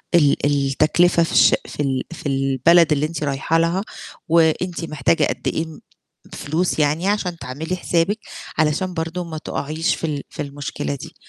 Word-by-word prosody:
ال 145 -3 +3
التكلفة 150 +5 +3
في 165 - -3
الش - - +6
في - - -11
ال 130 -2 -1
في 170 - -10
البلد 135 +5 +4
اللي 150 +1 +1
أنتِ 155 -1 -4
رايحة 140 +3 0
لها 170 +3 +1 0.5
وأنتِ 165 +2 +2
محتاجة 155 0 +1
قد - - -4
إيه 160 - 0
م 160 -1 -11 0.5
فلوس 160 +3 -1
يعني 155 +5 +1
عشان 190 -4 -1
تعملي 150 +8 -4
حسابِك 180 +4 0 0.4
علشان 155 +4 +1
برضه 165 +2 -3
ما 160 -2 -6
تقعيش 155 +1 -2
في - - -12
ال 145 -2 -3
في - - -7
المشكلة 140 - -4
دي. - - -10
160 Hz, 165 wpm, -21 LUFS, 145-170 Hz, 0.5 s, الش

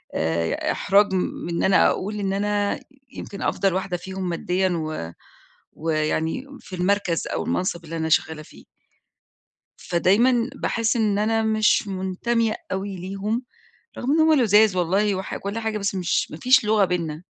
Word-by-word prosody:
آآ 80 +1 0
إحراج 200 0 +3
من 180 -1 -2
إن 170 - -1
أنا 190 - +5
أقول 210 +2 -3
إن 195 -1 -1
أنا 205 0 0 0.3
يمكن 200 - -8
أفضل 195 -2 +1
واحدة 185 -1 -2
فيهم 190 0 -5
ماديًا 180 +2 0
و 155 - -3 0.6
ويعني 160 - -1
في 185 - -9
المركز 180 -2 0
أو - - -2
المَنصِب 175 -2 -2
اللي 165 +1 -6
أنا 160 0 -2
شغّالة 155 0 +1
فيه. - - -16 1.1
فدايمًا 230 +8 +2
باحس 230 -2 0
إن 210 -3 +1
أنا 225 +1 +1
مش 215 -1 +2
مُنتمية 215 +4 -1 0.2
أوي 190 +1 -3
ليهم، 200 +6 -3 0.6
رغم 255 - -2
إن 320 - +3
هم 315 0 +5
لُذاذ 210 -3 +5
والله 195 +4 +1
وح 190 0 -4
وكل 200 +3 -4
حاجة، 220 -1 -2
بس 200 -1 -2
مش 180 -2 0
ما 155 - -7
فيش 255 +5 +4
لغة 210 -1 +3
بيننا. 170 -2 -3
195 Hz, 155 wpm, -23 LUFS, 175-215 Hz, 1.1 s, أنا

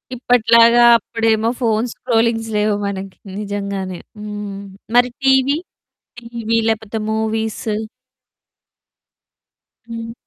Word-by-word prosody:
ఇప్పట్లాగా 235 -1 +5 0.2
అప్పుడేమో 225 0 0
phones 225 0 0
scrollings 225 -2 0
లేవు 210 0 +2
మనకి 195 -1 -6 0.2
నిజంగానే. 200 -3 -4 0.2
హ్మ్. 205 -1 -6 0.4
మరి 245 0 +5
టీవీ, 265 +2 +3 0.6
టీవీ 230 -1 -2
లేకపోతే 220 0 -2
మూవీస్? 220 0 -2 2.3
హ్మ్. 230 0 -6
225 Hz, 80 wpm, -18 LUFS, 210-235 Hz, 2.3 s, ఇప్పట్లాగా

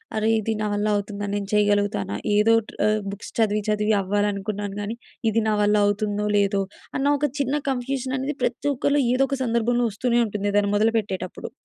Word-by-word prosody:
అరే! 215 0 +1
ఇది 220 +1 -1
నా - - 0
వల్ల 205 +1 0
అవుతుందా? 205 0 -3
నేను 200 -1 -3
చేయగలుగుతానా? 205 -1 +1 0.2
ఏదోటి 225 +1 +3
ఆహ్, 215 0 +2
బుక్స్ 200 - -8
చదివి 215 -1 +2
చదివి 210 0 +2
అవ్వాలనుకున్నాను 205 0 -2
గానీ, 210 +3 -4 0.4
ఇది 225 - +2
నా 215 - +2
వల్ల 205 +1 +3
అవుతుందో, 205 0 -1
లేదో 200 0 +2 0.4
అన్న 270 - -1
ఒక 295 - +2
చిన్న 280 +1 0
కన్‌ఫ్యూజన్ 260 0 -2
అనేది 275 +3 -3
ప్రతి - - -1
ఒక్కరిలో 280 +2 +1
ఏదో 260 +2 +3
ఒక 275 - -1
సందర్భంలో 240 +1 +1
వస్తూనే 240 +3 +1
ఉంటుంది 205 -1 -2
ఏదైనా 200 0 +2
మొదలుపెట్టేటప్పుడు. 210 -4 -1
210 Hz, 170 wpm, -24 LUFS, 205-235 Hz, 0.4 s, ఏదోటి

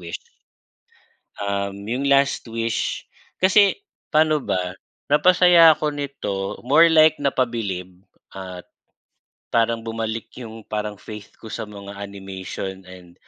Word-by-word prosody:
Wish." 85 -1 -6 1.2
Um, 100 0 -3
yung 125 +6 -2
"Last 140 -2 +2
Wish," 115 0 -2 0.4
kasi 200 - +4 0.2
paano 155 0 +3
ba? 90 -7 -2 0.4
Napasaya 170 0 +6
ako 150 0 -1
nito 135 -9 -4
more 155 +6 +6
like 155 -2 +5
napabilib 115 -9 -1 0.4
at 95 -2 -8 0.9
parang 115 0 +2
bumalik 115 0 -3
yung 115 -2 -9
parang 105 -1 -3
faith 105 -1 -10
ko 115 - -13
sa 110 - -4
mga 100 -1 -10
animation 95 -1 -7
and 90 -2 -14
115 Hz, 115 wpm, -22 LUFS, 100-145 Hz, 1.2 s, Napasaya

